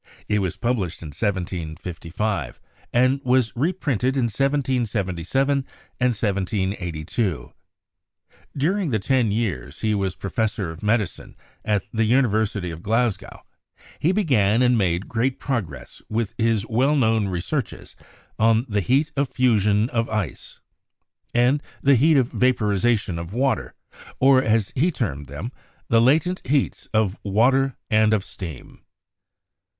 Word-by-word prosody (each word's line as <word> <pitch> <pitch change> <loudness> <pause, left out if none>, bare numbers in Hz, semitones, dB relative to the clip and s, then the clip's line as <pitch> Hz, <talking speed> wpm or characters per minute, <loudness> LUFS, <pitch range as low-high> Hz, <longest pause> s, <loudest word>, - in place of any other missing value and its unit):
It 105 - +1
was 95 -4 -2
published 105 -10 -2
in 80 - -7
1755, 90 - -3 0.3
and 130 +3 +3
was 125 -2 +2
reprinted 135 - 0
in 130 - +2
1777 130 - 0 0.4
and 125 0 +2
17G2. 95 -3 -2 1.0
During 175 +5 +1
the 115 - +1
ten 120 +2 +1
years 100 - -3
he 110 -1 +1
was 95 -3 -1
Professor 100 -3 -2
of 80 - -11
Medicine 105 -2 -1 0.3
at 105 -4 0
the 115 0 +2
University 110 -6 +1
of 80 0 -8
Glasgow 110 -1 -1 0.6
he 165 - +2
began 125 - +2
and 125 0 +4
made 90 -3 0
great 125 +3 0
progress 120 - -4
with 110 -1 -1
his 115 -2 +1
well 130 +6 +2
known 110 -6 +2
re 90 -2 -2
searches 135 - -4 0.4
on 115 +2 +3
the 105 -3 0
heat 135 +9 +1
of 140 -1 0
fusion 105 -4 +2
of 115 -1 0
ice, 105 - -4 0.7
and 125 +4 +3 0.2
the 140 - +5
heat 150 +5 +4
of 130 -2 +2
vaporization 105 -6 +1
of 85 +3 -7
water, 125 - 0 0.4
or, 135 0 +6
as 110 -4 +1
he 155 +7 +2
termed 75 - -3
them, 75 - -6 0.4
the 115 0 +5
"latent 160 +9 +2
heats" 140 +1 0
of 110 -3 +1
water 130 +6 +2
and 110 0 +4
of 100 - -2
steam. 80 -9 -9
110 Hz, 130 wpm, -23 LUFS, 100-130 Hz, 1.0 s, or